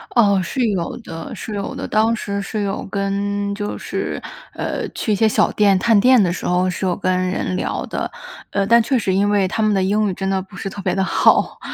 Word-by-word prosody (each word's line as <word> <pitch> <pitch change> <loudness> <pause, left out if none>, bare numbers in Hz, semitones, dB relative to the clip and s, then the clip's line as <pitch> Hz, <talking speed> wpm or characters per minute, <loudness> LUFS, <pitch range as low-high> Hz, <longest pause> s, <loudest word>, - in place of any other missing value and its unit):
哦， 200 -5 +4
是 240 +7 -1
有 180 -5 -2
的 165 -8 -8
是 215 - -6
有 200 +5 -4
的。 270 - -5
当 220 +2 +2
时 200 -2 -3
是 210 +1 -3
有 195 -1 -2
跟 200 +1 -2
就 205 0 -4
是， - - -4 0.3
呃， - - -3
去 215 - -3
一 - - +3
些 220 +2 +3
小 - - +2
店 200 -2 +3
探 220 +3 +3
店 250 +1 +6
的 175 -2 +2
时 - - -4
候， 180 +1 +2
是 180 +1 -3
有 180 - +1
跟 185 -2 0
人 185 0 -2
聊 - - -2
的。 - - -3 0.4
呃， 200 -1 0
但 235 +3 +5
确 255 +3 +1
实 195 -4 0
因 200 +2 +2
为 200 -2 +2
他 220 - -2
们 215 0 +3
的 190 -2 +2
英 210 +2 +1
语， - - -2
真 195 - -3
的 190 0 0
不 195 +1 -13
是 - - -5
特 195 +1 -6
别 - - -1
地 190 - +1
好， - - +3
200 Hz, 255 characters per minute, -20 LUFS, 190-215 Hz, 0.4 s, 店